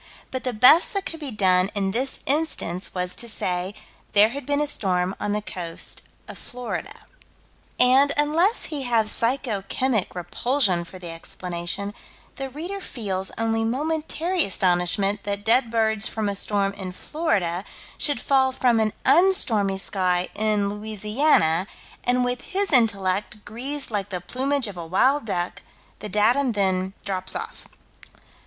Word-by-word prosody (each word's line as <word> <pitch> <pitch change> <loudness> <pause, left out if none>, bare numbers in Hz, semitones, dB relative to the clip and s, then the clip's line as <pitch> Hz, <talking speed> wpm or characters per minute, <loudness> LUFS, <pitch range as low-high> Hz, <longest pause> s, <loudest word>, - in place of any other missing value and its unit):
But 260 -1 -4
the 250 - +1
best 250 - +5
that 395 - -1
could 325 - -4
be 295 -3 -5
done 190 -4 +2
in 195 -1 0
this 255 +5 -2
instance 275 - -1
was 180 0 -2
to 235 - -4
say: 185 -1 -2 0.4
"There 210 +1 +6
had 275 +2 -7
been 285 0 +1
a 295 - +2
storm 185 -9 0
on 205 - -2
the 210 0 -1
coast 170 -5 -5 0.3
of - - -10
Florida." 245 0 -6 0.7
And, 265 +3 +6
unless 325 +9 +2
he 290 - -2
have 230 -4 +2
psycho 235 -3 0
chemic 245 -9 0
repulsion 180 - 0
for 185 - -11
the 175 -2 -7
explanation, 175 +4 -4 0.4
the 270 -1 -4
reader 345 +9 -6
feels 195 - -3
only 225 0 0
momentary 315 +7 0
astonishment 190 +2 +1
that 205 0 -4
dead 235 +1 +4
birds 220 -2 +1
from 215 -2 -2
a 200 - -2
storm 200 0 +1
in 190 -2 -6
Florida 190 - -1 0.4
should 290 -5 +2
fall 265 0 +3
from 245 -3 +2
an 215 -1 +1
unstormy 220 - +4
sky 185 -2 0
in 210 -2 +1
Louisiana, 210 - +1 0.4
and 250 0 +2
with 245 0 -2
his 395 0 -2
intellect 210 -3 +1
greased 265 +5 -3
like 205 -2 -2
the 180 - -3
plumage 265 +7 -1
of 200 -3 -8
a 170 - -5
wild 260 - +2
duck, 175 -4 -3 0.4
the 210 - -6
datum 235 +6 +2
then 190 -2 0
drops 190 -1 -1
off. - - -6
215 Hz, 150 wpm, -24 LUFS, 190-265 Hz, 0.7 s, There